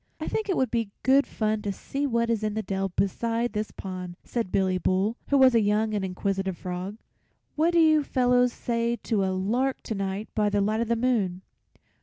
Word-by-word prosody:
"I - - -4
think 435 -1 -2
it 375 - +1
would 260 -3 +1
be 230 -3 0
good 270 +2 +4
fun 215 -1 -1
to 205 -1 -2
see 275 +8 -3
what 235 -2 +1
is 225 -2 0
in 215 -1 -2
the 220 - -2
dell 195 -1 -2
beside 230 +5 -1
this 210 0 -2
pond," 180 -2 -7
said 230 -6 -3
Billy 185 -1 +1
Bull, 190 +5 +1
who 280 - +3
was 260 -2 +6
a 230 - +5
young 215 +1 +1
and 205 -2 -1
inquisitive 190 0 -2
frog. 185 +3 -5 0.6
"What 320 +3 +3
do 340 - +4
you 310 -2 +5
fellows 250 -2 +3
say 235 0 -1
to 215 -4 -1
a - - +1
lark 235 +8 -1
to - - -3
night 195 +1 -3
by 210 -1 +2
the 205 0 +1
light 215 +3 +1
of 235 - -1
the 235 - +2
moon?" 215 -7 0
215 Hz, 215 wpm, -26 LUFS, 195-240 Hz, 0.6 s, was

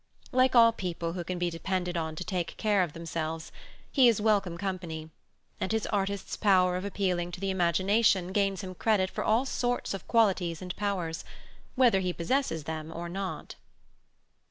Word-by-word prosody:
Like 255 0 +3
all 230 -1 +8
people 175 -5 -4
who 175 -1 -4
can 180 +2 -4
be 175 0 -1
depended 180 +1 -2
on 160 -2 -2
to 180 - -4
take 180 -3 -3
care 210 -3 +2
of 170 -5 -1
themselves, 165 -1 -4 0.4
he 265 -3 +6
is 230 -3 +4
welcome 205 -5 +1
company; 170 -5 -4 0.5
and 190 - -2
his 220 -1 0
artist's 200 -1 -2
power 185 -3 +3
of 180 - -3
appealing 185 -3 -1
to - - -6
the 195 0 -1
imagination 185 +2 +2
gains 195 -1 +1
him 185 -2 -6
credit 190 -1 +1
for - - -3
all 225 +5 +2
sorts 245 -4 -1
of 195 - -7
qualities 190 -8 +2
and 180 -1 -6
powers, 185 -6 -2 0.5
whether 245 -7 +5
he 180 -1 -1
possesses 170 - -1
them 155 +1 -5
or 170 +1 -5
not. 190 +1 -5
185 Hz, 175 wpm, -29 LUFS, 170-205 Hz, 0.5 s, all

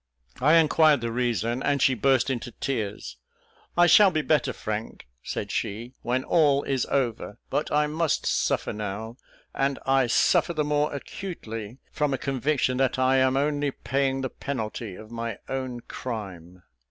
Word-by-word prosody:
I 150 +5 +5
inquired 155 -3 +5
the 115 0 -2
reason, 120 0 -1
and 140 0 +1
she 135 - +4
burst 130 +2 +2
into 125 -1 -4
tears. 105 - -4 0.6
"I 175 - +7
shall 195 +4 +7
be 155 -4 -1
better, 145 -4 +2
Frank," 110 -2 -5 0.2
said - - -4
she, 115 +5 -3
"when 125 +2 -1
all 145 -4 +3
is 135 -3 -1
over, 120 -6 -1
but 150 - -1
I 150 0 +3
must 155 +1 0
suffer - - 0
now; 110 +3 -5 0.4
and 135 0 0
I 135 -1 +3
suffer 145 +7 +3
the 155 - +1
more 150 0 +1
acutely 120 - -7
from 150 -2 0
a - - -4
conviction 135 -1 0
that 130 -1 +1
I 130 +1 +3
am 130 0 +3
only 145 0 +1
paying 135 +1 -1
the 130 - -2
penalty 110 -6 -5
of 110 +4 -12
my 115 -2 -4
own 130 -2 -4
crime. 95 -9 -7
130 Hz, 160 wpm, -26 LUFS, 115-145 Hz, 0.6 s, I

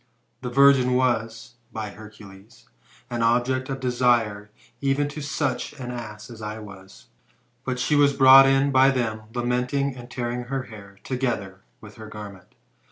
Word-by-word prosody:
This 125 -2 -5
virgin 135 -2 +5
was, 120 -2 -1
by 110 -2 -5
Hercules, 105 0 -15 0.4
an 120 -1 -2
object 125 +3 +1
of 135 0 -4
desire 120 -5 +1 0.3
even 140 +1 +1
to 150 +1 -7
such 145 +1 -2
an 130 -4 -7
ass 115 -2 -8
as 115 -1 -11
I 105 0 -5
was; 95 -3 -13 0.6
but 130 -2 -3
she 135 +4 +1
was 145 -1 +5
brought 135 0 +8
in 135 +1 +3
by 130 0 +5
them, 115 -5 -1
lamenting 125 +3 -1
and 120 -1 -11
tearing 120 0 -4
her 135 +1 -3
hair, 100 -4 -13
together 115 -8 -3 0.2
with 105 0 -13
her 110 -1 -10
garment. 100 -4 -11
120 Hz, 155 wpm, -24 LUFS, 110-130 Hz, 0.6 s, brought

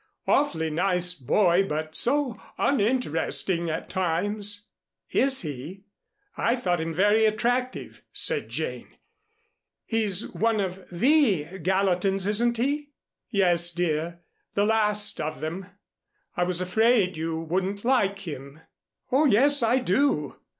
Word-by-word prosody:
Awfully 160 - +1
nice 180 +2 0
boy, 180 +5 +2
but 155 +1 -4
so 270 -2 +1 0.2
uninteresting 200 - 0
at 160 - -4
times." 205 +3 -1 0.4
"Is 265 -3 +3
he? 155 +6 -7 0.5
I 235 - +1
thought 180 -9 -1
him 165 +1 -3
very 205 +6 +3
attractive," 245 +4 -1
said 480 -3 -1
Jane. - - -5 0.9
"He's 215 -3 0
one 225 -1 +1
of 190 -1 -4
the 190 - +2
Gallatins, 190 +1 +1
isn't 235 +3 +1
he?" 285 +4 -1 0.4
"Yes, 175 -4 +3
dear, 170 0 -2 0.3
the 205 - +2
last 210 -1 +1
of 155 0 -4
them. 175 +4 -5 0.7
I 175 - +1
was 180 0 0
afraid 205 0 +2
you 160 0 -3
wouldn't 190 +6 -3
like 200 -7 +1
him." 140 0 -8 0.5
"Oh, 280 +5 +3
yes, 280 +3 +4
I 230 +2 +3
do. 245 - 0
195 Hz, 120 wpm, -25 LUFS, 170-230 Hz, 0.9 s, yes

